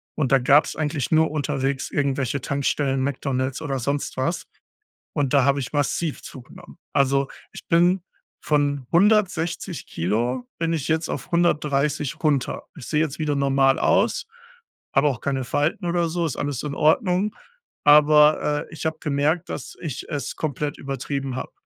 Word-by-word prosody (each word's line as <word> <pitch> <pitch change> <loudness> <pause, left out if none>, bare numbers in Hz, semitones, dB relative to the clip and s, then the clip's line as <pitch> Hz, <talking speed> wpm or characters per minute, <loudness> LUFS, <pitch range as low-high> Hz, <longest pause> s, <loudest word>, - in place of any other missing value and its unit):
und 135 -5 -1
da 135 - +6
gab's 140 +4 +4
eigentlich 150 -3 -2
nur 160 -1 +4
unterwegs 140 -3 -2
irgendwelche 140 -2 -1
Tankstellen, 140 -1 0
McDonald's 130 -1 -2
oder 135 -4 -2
sonst 140 +3 -2
was. 130 +7 -1 0.7
Und 145 -3 0
da 140 -2 +5
habe 140 0 +3
ich 130 - -5
massiv 145 +2 -1
zugenommen. 125 -2 -12 0.2
Also, 140 0 +2 0.2
ich - - -11
bin 175 +3 +3 0.4
von 145 -3 0
160 180 -3 +1
Kilogramm 120 +9 -1
bin 165 0 0
ich 150 -5 -2
jetzt 160 0 0
auf - - -5
130 150 -4 +1
runter. 145 -4 0
Ich - - -9
sehe 150 - +1
jetzt 155 -3 -2
wieder 150 -2 0
normal 135 -1 +3
aus, - - +2 0.7
hab 135 +2 +3
auch 135 -6 +1
keine 135 -2 -1
Falten 150 +8 -1
oder 170 0 +1
so, 170 +1 -1
ist 150 - -3
alles 145 -3 -2
in 145 -2 -4
Ordnung. 185 - +2 0.5
Aber 150 0 +5
äh, - - -14
ich 160 - -7
habe 160 0 -1
gemerkt, 150 +3 0
dass 130 - -6
ich 145 -6 -5
es 145 -3 -4
komplett 150 -1 -3
übertrieben 135 -1 -4
hab. - - -5
145 Hz, 160 wpm, -23 LUFS, 135-160 Hz, 0.7 s, da